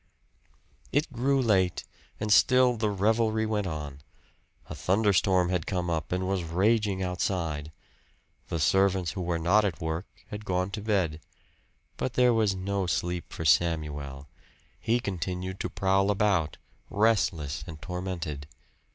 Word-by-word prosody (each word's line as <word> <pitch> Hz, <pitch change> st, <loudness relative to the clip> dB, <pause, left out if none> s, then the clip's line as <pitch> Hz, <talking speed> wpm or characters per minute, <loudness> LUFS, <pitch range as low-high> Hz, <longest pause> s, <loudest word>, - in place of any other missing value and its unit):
It 145 Hz, 0 st, 0 dB
grew 135 Hz, +3 st, +1 dB
late, 95 Hz, -7 st, +2 dB, 0.4 s
and 105 Hz, -1 st, +2 dB
still 125 Hz, +1 st, +5 dB
the 110 Hz, -1 st, 0 dB
revelry 110 Hz, +2 st, +1 dB
went 105 Hz, -2 st, -1 dB
on. 75 Hz, -4 st, -6 dB, 0.7 s
A -, -, -7 dB
thunderstorm 95 Hz, -2 st, +2 dB
had 90 Hz, -3 st, -1 dB
come 90 Hz, -2 st, -1 dB
up 80 Hz, -3 st, -2 dB
and 90 Hz, +1 st, -1 dB
was 95 Hz, -1 st, 0 dB
raging 95 Hz, +3 st, +1 dB
outside. 85 Hz, -4 st, -2 dB, 0.8 s
The 85 Hz, -, -2 dB
servants 95 Hz, +1 st, +2 dB
who 95 Hz, -, -5 dB
were 85 Hz, -1 st, -1 dB
not 90 Hz, +6 st, +3 dB
at 95 Hz, -6 st, -2 dB
work, 80 Hz, +3 st, -3 dB, 0.2 s
had 105 Hz, 0 st, -6 dB
gone 90 Hz, -1 st, -1 dB
to 105 Hz, -, -4 dB
bed, 95 Hz, -7 st, 0 dB, 0.8 s
but 130 Hz, -, -2 dB
there 125 Hz, 0 st, +4 dB
was 110 Hz, -4 st, +2 dB
no 95 Hz, 0 st, -2 dB
sleep 90 Hz, 0 st, -2 dB
for 80 Hz, -, -5 dB
Samuel; 75 Hz, -4 st, 0 dB, 0.5 s
he 115 Hz, +2 st, +1 dB
continued 95 Hz, -2 st, -4 dB
to -, -, -2 dB
prowl 95 Hz, +1 st, +1 dB
about, 100 Hz, -7 st, +1 dB, 0.3 s
restless 90 Hz, -9 st, +1 dB
and 80 Hz, -3 st, -8 dB
tormented. 85 Hz, -5 st, -5 dB
95 Hz, 140 wpm, -28 LUFS, 85-105 Hz, 0.8 s, still